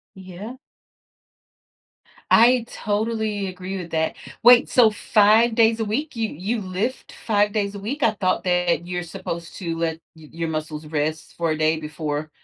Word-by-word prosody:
Yeah. 190 Hz, +5 st, -9 dB, 1.8 s
I 240 Hz, +1 st, +6 dB
totally 215 Hz, -1 st, -2 dB
agree 185 Hz, +1 st, -6 dB
with 175 Hz, -2 st, -7 dB
that 160 Hz, 0 st, -1 dB, 0.3 s
wait, 240 Hz, +1 st, +7 dB
so 235 Hz, -3 st, +5 dB
5 215 Hz, +2 st, +3 dB
days 225 Hz, 0 st, +3 dB
a -, -, +1 dB
week? 250 Hz, +7 st, -3 dB
You 225 Hz, -1 st, -1 dB
you 205 Hz, +9 st, -3 dB
lift 195 Hz, +7 st, -4 dB
5 205 Hz, -2 st, +2 dB
days 205 Hz, -1 st, -1 dB
a -, -, -6 dB
week? 250 Hz, +9 st, -5 dB
I 225 Hz, -, +4 dB
thought 185 Hz, -3 st, -1 dB
that 180 Hz, -2 st, +1 dB
you're 180 Hz, 0 st, -3 dB
supposed 170 Hz, -1 st, -7 dB
to 170 Hz, -4 st, -4 dB
let 165 Hz, -1 st, -2 dB, 0.2 s
y 155 Hz, -1 st, -14 dB
your 165 Hz, 0 st, -3 dB
muscles 155 Hz, -1 st, -4 dB
rest 155 Hz, 0 st, -3 dB
for 170 Hz, -1 st, 0 dB
a 155 Hz, -, -1 dB
day 155 Hz, +1 st, +2 dB
before 155 Hz, 0 st, -4 dB
190 Hz, 165 wpm, -22 LUFS, 165-220 Hz, 1.8 s, wait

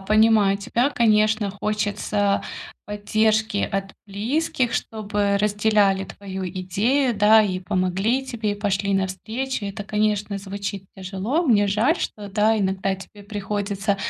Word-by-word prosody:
понимаю 215 Hz, -1 st, +4 dB
тебя, 240 Hz, +7 st, 0 dB
конечно, 215 Hz, -3 st, +3 dB
хочется 205 Hz, 0 st, -1 dB, 0.4 s
поддержки 215 Hz, +1 st, +1 dB
от 195 Hz, 0 st, -3 dB
близких, 240 Hz, +5 st, -1 dB
чтобы 205 Hz, -2 st, -1 dB
разделяли 205 Hz, -1 st, +2 dB
твою 190 Hz, -1 st, -7 dB
идею, 210 Hz, +9 st, 0 dB
да, 215 Hz, +2 st, +6 dB
и 185 Hz, -3 st, 0 dB
помогли 195 Hz, +7 st, 0 dB
тебе, 230 Hz, -5 st, -2 dB
и 205 Hz, -, -1 dB
пошли 200 Hz, -1 st, 0 dB
навстречу. 215 Hz, +7 st, -2 dB
Это, 200 Hz, +1 st, -5 dB
конечно, 210 Hz, -1 st, 0 dB
звучит 195 Hz, -1 st, -5 dB
тяжело. 195 Hz, -, -2 dB
Мне 205 Hz, -7 st, +3 dB
жаль, 230 Hz, -, +2 dB
что, 210 Hz, -1 st, -4 dB
да, 215 Hz, +2 st, +2 dB
иногда 190 Hz, -1 st, 0 dB
тебе 200 Hz, +2 st, -13 dB
приходится 200 Hz, -1 st, -2 dB
205 Hz, 125 wpm, -23 LUFS, 195-220 Hz, 0.4 s, да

